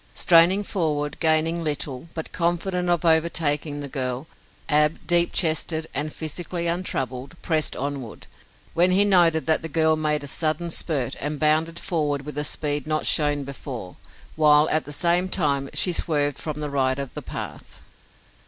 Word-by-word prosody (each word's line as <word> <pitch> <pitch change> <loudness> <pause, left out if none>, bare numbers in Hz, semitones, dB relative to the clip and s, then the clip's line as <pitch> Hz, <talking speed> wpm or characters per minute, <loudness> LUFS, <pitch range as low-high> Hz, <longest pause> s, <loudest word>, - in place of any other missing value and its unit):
Straining 175 +4 +4
forward, 150 -7 -2
gaining 160 +1 +2
little, 145 -1 -3
but 160 - -5
confident 175 +1 -1
of 175 -1 +1
overtaking 155 -3 +1
the 145 - -5
girl, 130 0 -3 0.4
Ab, 150 +1 +3
deep 175 -1 +5
chested 160 -1 +1
and 150 +2 -2
physically 170 +3 -5
untroubled, 140 -4 -3
pressed 155 -2 0
onward, 135 -4 -5 0.5
when 175 +2 +3
he 195 +3 +4
noted 170 -5 +4
that 160 -1 +2
the 160 - -6
girl 160 0 +2
made 150 -1 0
a - - -7
sudden 155 +3 -1
spurt 145 -7 -1
and 145 +1 -3
bounded 160 +2 +1
forward 150 -6 -2
with 150 0 -5
a - - -1
speed 145 -1 -1
not 155 0 -1
shown 145 -2 +2
before, 130 -8 -8 0.4
while, 150 -1 +5
at 155 - +2
the 145 - -8
same 175 +4 +2
time, 140 -7 +1
she 180 - +1
swerved 145 -4 0
from 150 -1 -5
the 150 -1 -4
right 130 -1 0
of 140 -2 -6
the - - -6
path. - - -8
155 Hz, 160 wpm, -23 LUFS, 145-170 Hz, 0.5 s, deep